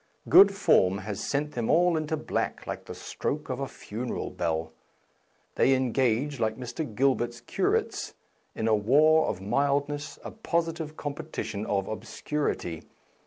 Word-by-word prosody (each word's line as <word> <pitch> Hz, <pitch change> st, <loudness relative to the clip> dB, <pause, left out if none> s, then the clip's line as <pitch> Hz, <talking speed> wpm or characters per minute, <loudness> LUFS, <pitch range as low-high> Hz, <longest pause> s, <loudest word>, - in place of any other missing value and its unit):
Good 200 Hz, 0 st, +8 dB
form 95 Hz, -, +3 dB
has 100 Hz, 0 st, -5 dB
sent 145 Hz, +1 st, -1 dB
them 120 Hz, -2 st, -2 dB
all 175 Hz, +1 st, +4 dB
into 155 Hz, 0 st, -1 dB
black 150 Hz, -, -2 dB
like -, -, -5 dB
the -, -, -8 dB
stroke 150 Hz, -2 st, -4 dB
of 130 Hz, -, -3 dB
a 135 Hz, -, -2 dB
funeral 120 Hz, +2 st, -5 dB
bell. 80 Hz, -1 st, -2 dB, 0.9 s
They 135 Hz, -, +5 dB
en 130 Hz, -2 st, 0 dB
gage, 130 Hz, +3 st, +1 dB
like 110 Hz, -1 st, 0 dB
Mr. 125 Hz, -1 st, -5 dB
Gilbert's 120 Hz, -2 st, +1 dB
curates, 120 Hz, -, -1 dB, 0.4 s
in 110 Hz, -, -1 dB
a 110 Hz, -, +4 dB
war 150 Hz, +9 st, +4 dB
of 95 Hz, -, -3 dB
mildness, 140 Hz, +6 st, 0 dB
a -, -, -6 dB
positive 165 Hz, -6 st, -2 dB
competition 145 Hz, -8 st, -4 dB
of 100 Hz, -1 st, 0 dB
ob 110 Hz, -, -5 dB
scurity. 115 Hz, -, -3 dB
135 Hz, 150 wpm, -28 LUFS, 110-150 Hz, 0.9 s, Good